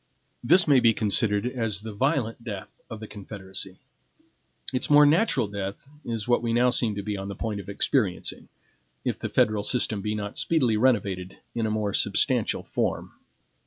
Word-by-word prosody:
This 170 +8 +5
may 140 -3 +6
be 115 -2 +4
considered 105 0 +1
as 115 -5 -2
the 110 0 -7
violent 120 -1 -1
death 100 -5 -8
of 110 - -7
the 110 - -7
Confederacy. 95 -2 -7 1.0
Its 130 - -1
more 145 0 +7
natural 145 - +2
death 100 +4 -6 0.2
is 115 -2 -4
what 120 -2 +3
we 115 -1 -1
now 125 +1 +3
seem 115 -4 +1
to 100 - -4
be 105 +1 -3
on 95 0 -5
the 100 - -6
point 105 0 -4
of 100 - -9
experiencing, 100 -2 -1 0.6
if - - -2
the - - -4
federal 110 -1 +2
system 110 -2 +1
be 105 +1 -2
not 105 -1 -3
speedily 130 -9 +2
renovated 100 -6 0 0.2
in 115 -2 -1
a - - -1
more 105 -2 -1
substantial - - +3
form. - - -2
110 Hz, 175 wpm, -26 LUFS, 100-125 Hz, 1.0 s, more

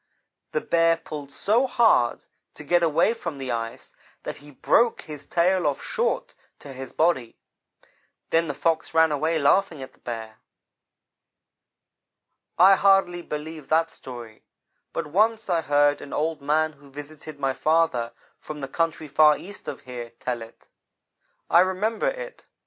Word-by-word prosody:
"The 470 - -1
Bear 165 - +3
pulled 145 -3 -8
so 230 - +2
hard 225 - +3 0.3
to - - -9
get 175 0 +2
away 165 +6 +3
from 170 -9 -6
the 135 -2 -4
ice, 115 -1 -5 0.3
that - - -6
he 145 - -15
broke 230 - +2
his 150 -2 -9
tail 180 0 +2
off 145 - -2
short - - -1 0.2
to 140 - -11
his 130 0 -8
body. 155 -8 0 0.9
Then 165 0 +2
the 145 - -4
Fox 165 +1 -1
ran 160 -1 +5
away 160 +3 0
laughing 155 0 +2
at 130 - -11
the - - -28
Bear. 110 -2 -7 2.2
"I 190 +2 +7
hardly 195 -3 +3
believe 155 -1 -7
that 165 +1 +2
story, 120 -4 -10 0.5
but 165 - -3
once 215 +6 +1
I 170 -2 +2
heard 145 0 +2
an 140 - -9
old 155 0 -1
man 155 +2 +1
who 145 -1 -19
visited 145 +1 -10
my 135 -1 0
father 155 -7 +1 0.3
from 150 -1 -8
the 135 - -4
country 165 +1 -2
far 150 +1 +5
east 205 +3 -11
of - - -6
here, 125 -3 -8
tell 120 -2 -3
it. 115 0 -13 0.8
I 170 - +5
remembered 215 - +1
it. - - -9
155 Hz, 155 wpm, -24 LUFS, 140-175 Hz, 2.2 s, I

